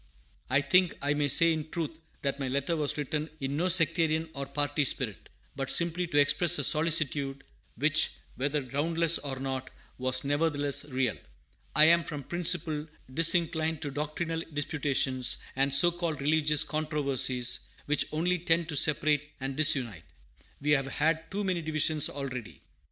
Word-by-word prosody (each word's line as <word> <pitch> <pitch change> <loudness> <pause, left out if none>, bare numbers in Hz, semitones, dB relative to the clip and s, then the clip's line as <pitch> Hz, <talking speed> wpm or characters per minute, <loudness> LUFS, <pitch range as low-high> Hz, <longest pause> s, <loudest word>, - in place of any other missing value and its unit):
I 135 +3 +3
think 180 +4 +2
I 145 +1 0
may 145 -1 0
say 165 +4 +4
in 155 -1 -5
truth 160 -1 -5 0.2
that 140 0 -2
my 135 - -3
letter 140 +5 -1
was 150 -2 -1
written 150 +2 -3
in 135 +1 -3
no 170 +5 0
sectarian 165 -2 +3
or 140 -2 -5
party 145 +1 -1
spirit, 125 -6 -2 0.3
but 135 -1 -4
simply 170 +3 0
to 145 - -2
express 170 +4 +4
a - - -1
solicitude, 150 -4 0 0.3
which, 155 +1 +2 0.3
whether 145 +2 -1
groundless 165 +5 +1
or 135 -2 -5
not, 130 -1 -5 0.3
was 130 0 0
nevertheless 145 -1 0
real. 130 - -1 0.6
I 150 +2 +7
am, 170 +1 +5
from 150 -4 -6
principle, 170 -2 0 0.3
disinclined 160 0 +2
to 145 - -4
doctrinal 155 +3 -4
disputations 140 -3 -1 0.2
and 135 +1 +1
so 175 +4 +6
called 170 -3 -4
religious 150 +1 +2
controversies, 135 -5 0 0.3
which 150 +1 0
only 175 +3 0
tend 165 0 +1
to 150 - -3
separate 150 0 +2
and 135 0 -4
disunite. 130 - +4 0.5
We 150 +1 -1
have 135 -2 +2
had 160 +4 -1
too 205 +2 -3
many 185 -3 -1
divisions 155 -1 +1
already. 130 -5 -7
150 Hz, 155 wpm, -28 LUFS, 140-165 Hz, 0.6 s, I